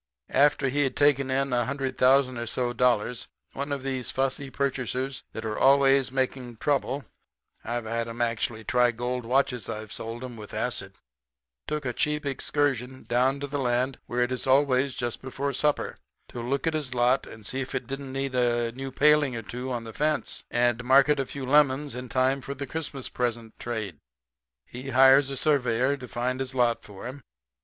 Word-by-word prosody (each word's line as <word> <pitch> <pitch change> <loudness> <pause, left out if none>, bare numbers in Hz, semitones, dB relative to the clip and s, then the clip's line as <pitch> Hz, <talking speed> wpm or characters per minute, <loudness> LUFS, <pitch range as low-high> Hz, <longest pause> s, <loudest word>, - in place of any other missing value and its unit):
After 140 0 +4
he 145 +3 +1
had 135 - -1
taken 140 -2 +3
in 135 0 0
a 120 -1 +2
hundred 135 0 -2
thousand 130 -1 +4
or 120 - -4
so 120 +1 -1
dollars 120 -1 +1 0.3
one 140 +1 -4
of 140 -2 -2
these 130 -2 -1
fussy 135 +1 -1
purchasers 130 -1 -2
that 110 - -6
are 110 -1 -3
always 135 -1 +5
making 130 -2 -2
trouble 140 0 0 0.6
(I've 120 0 -3
had 115 +1 -2
'em 115 +1 -7
actually 115 -1 -1
try 125 +2 +3
gold 120 +1 -3
watches 125 -3 +1
I've 110 -1 -5
sold 115 +2 -6
'em 125 -2 -7
with 105 -1 -9
acid) - - -2 0.7
took 150 -2 -3
a 125 - -1
cheap 150 +2 0
excursion 135 -2 -1
down 130 +3 +1
to - - -1
the 140 0 -3
land 125 +1 0
where 120 +1 -1
it 120 - -2
is 130 +1 -2
always 135 -1 +3
just 120 -1 -3
before 135 +2 -3
supper 150 +3 0 0.3
to 120 - -6
look 135 +3 -1
at 165 - +1
his 145 -5 -2
lot 125 +2 +2
and 110 -2 -11
see 130 +5 -2
if 130 - -5
it - - -2
didn't 135 +1 -6
need 135 0 -2
a 120 -2 +1
new 135 +2 -6
paling 145 -1 +4
or 115 - -4
two 125 +4 -5
on 120 -2 -2
the 115 -1 -9
fence, 155 +4 -1
and 120 0 +1
market 140 +3 +5
a 135 - -1
few 140 -2 -6
lemons 145 0 +3
in 125 0 -6
time 130 +2 +2
for 140 +2 -6
the 140 +1 -5
Christmas 140 -2 -5
present 115 -2 -3
trade. 110 -9 -4 0.7
He 125 - -8
hires 135 +1 +6
a 135 - -4
surveyor 130 -3 +2
to 125 -2 -9
find 125 +2 -2
his 130 0 -4
lot 120 -2 +2
for 100 0 -11
him. 130 +3 -7
130 Hz, 195 wpm, -27 LUFS, 120-135 Hz, 0.7 s, hires